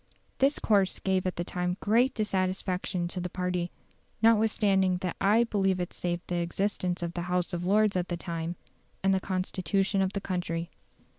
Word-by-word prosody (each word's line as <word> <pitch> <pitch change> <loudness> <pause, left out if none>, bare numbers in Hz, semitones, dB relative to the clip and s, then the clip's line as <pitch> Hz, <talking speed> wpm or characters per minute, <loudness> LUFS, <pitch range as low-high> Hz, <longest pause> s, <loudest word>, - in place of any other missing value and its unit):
This 275 +2 +3
course 200 -3 +2
gave 190 -1 0
at 180 - -2
the 175 - -2
time 180 +1 -2
great 240 +5 +3
dissatisfaction 185 -3 -1
to 180 - -4
the 180 - -3
party; 180 -1 -2 0.5
notwithstanding 210 -4 +3
that 180 -2 -2
I 210 +4 +5
believe 195 -5 +1
it 180 - -3
saved 175 0 -2
the 175 - -2
existence 180 0 -1
of 170 0 -3
the 175 - -3
House 180 -1 0
of 175 0 -2
Lords 210 +1 +3
at 180 -1 0
the 175 - -2
time, 170 0 -4 0.5
and 195 0 +4
the 190 - +2
Constitution 195 +1 0
of 190 0 0
the 200 - -1
country. 175 -3 -3
185 Hz, 175 wpm, -29 LUFS, 175-200 Hz, 0.5 s, I